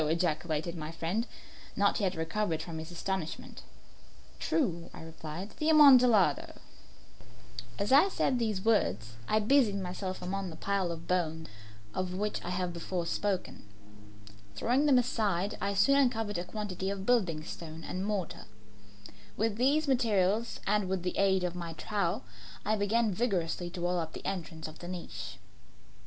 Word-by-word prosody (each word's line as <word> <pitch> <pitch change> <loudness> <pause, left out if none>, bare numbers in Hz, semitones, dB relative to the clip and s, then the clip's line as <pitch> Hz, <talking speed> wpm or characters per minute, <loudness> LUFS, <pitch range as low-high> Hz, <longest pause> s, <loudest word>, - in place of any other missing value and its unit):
ejaculated 160 0 0
my 155 -1 -5
friend, 170 +8 -2 0.5
not 200 0 +2
yet 190 -3 0
recovered 165 +1 -1
from 165 -2 -5
his 160 +1 -7
astonishment. 175 -1 -4 0.8
"True," 170 - 0
I - - -9
replied; 160 +4 -7
"the 310 - +2
Amontillado." 250 - +6 1.2
As 205 - -1
I 295 +9 +7
said 260 -8 +1
these 215 -4 -1
words 115 - +2
I 215 - +3
busied 215 -2 +3
myself 185 0 -4
among 190 +1 -3
the 160 - -8
pile 195 +1 0
of 165 0 -7
bones 160 -3 -1 0.4
of 185 -1 -2
which 210 +2 -2
I - - -4
have 180 -1 -1
before 170 +1 -3
spoken. 190 - -2 0.9
Throwing 255 - +2
them 275 -3 +6
aside, 210 -6 +1
I 200 - 0
soon 275 +8 +5
uncovered 225 -8 +1
a 175 - -4
quantity 195 -2 -4
of 195 -1 -4
building 185 -11 +2
stone 160 0 -8
and 185 +3 -4
mortar. 200 -4 -3 0.9
With 220 0 0
these 285 +5 +3
materials 225 -4 +2
and 205 -2 +1
with 190 -2 -1
the 180 - -2
aid 190 -1 +3
of 180 -1 -1
my 170 -2 -5
trowel, 185 0 -1 0.4
I 215 - +2
began 215 +1 +1
vigorously 180 -5 -1
to 175 0 -7
wall 175 0 +1
up 160 -1 -4
the - - -9
entrance 165 -4 -4
of 155 0 -11
the 175 - -8
niche. 180 -1 -6
190 Hz, 155 wpm, -31 LUFS, 170-215 Hz, 1.2 s, I